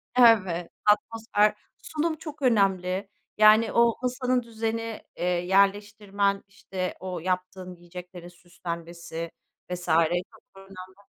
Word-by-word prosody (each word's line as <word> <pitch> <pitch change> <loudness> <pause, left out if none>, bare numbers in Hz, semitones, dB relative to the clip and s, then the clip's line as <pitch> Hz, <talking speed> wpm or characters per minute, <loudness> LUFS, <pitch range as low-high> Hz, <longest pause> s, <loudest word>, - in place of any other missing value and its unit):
Evet. 190 -8 +4
Atmosfer 210 0 +2 0.2
sunum 315 +1 -2
çok 305 -2 -9
önemli. 195 -5 +1 0.3
Yani, 215 +1 +6
o 235 -1 +4
masanın 250 0 0
düzeni, 225 0 -4 0.2
eee, - - -4
yerleştirmen, 200 +2 +1
işte, 190 -2 -5
o 185 -2 -5
yaptığın 185 +1 -3
yiyeceklerin 175 0 -11
süslenmesi 170 -1 -7 0.4
vs. 180 -1 -4 0.5
çok 220 -1 -23
da - - -13
önemli. 190 +1 -13
195 Hz, 105 wpm, -26 LUFS, 180-225 Hz, 0.5 s, Yani